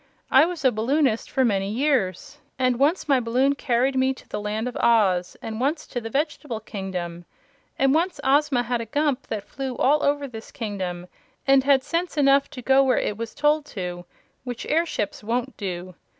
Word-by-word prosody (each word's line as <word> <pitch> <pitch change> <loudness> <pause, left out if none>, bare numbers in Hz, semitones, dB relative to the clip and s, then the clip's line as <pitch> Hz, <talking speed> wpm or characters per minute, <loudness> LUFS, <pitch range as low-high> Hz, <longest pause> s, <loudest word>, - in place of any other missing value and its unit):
I 270 +4 +7
was 340 -4 -5
a 260 - +6
balloonist 240 +2 +1
for 265 - +2
many 195 -3 0
years, 255 - -1 0.2
and 255 -1 +1
once 305 +6 +2
my 275 -3 +4
balloon 250 +4 +2
carried 260 -1 0
me 260 0 +2
to - - -16
the 210 - -4
Land 215 +3 -2
of 250 - -5
Oz, 190 -6 +2
and 220 +1 -5
once 300 +4 0
to 245 - -5
the 225 - -6
Vegetable 290 -3 -2
Kingdom. 185 -5 -5 0.5
And 270 0 +3
once 345 +4 0
Ozma 275 -2 +3
had 240 0 -1
a 230 - -6
Gump 285 +2 0
that 210 -2 -5
flew 265 -2 -5
all 295 +3 +3
over 285 0 +1
this 225 -3 -9
kingdom 185 -7 -4 0.4
and 270 -1 +5
had 275 -2 +4
sense 340 +2 -2
enough 275 -1 +4
to 250 - -9
go 270 +2 +5
where 260 -1 +2
it 210 - -1
was 225 +1 -6
told 295 +1 +2
to 175 -1 -4 0.4
which 245 -2 -6
airships 310 - -1
won't 240 +4 -2
do. 185 -2 -5
255 Hz, 190 wpm, -24 LUFS, 215-280 Hz, 0.5 s, I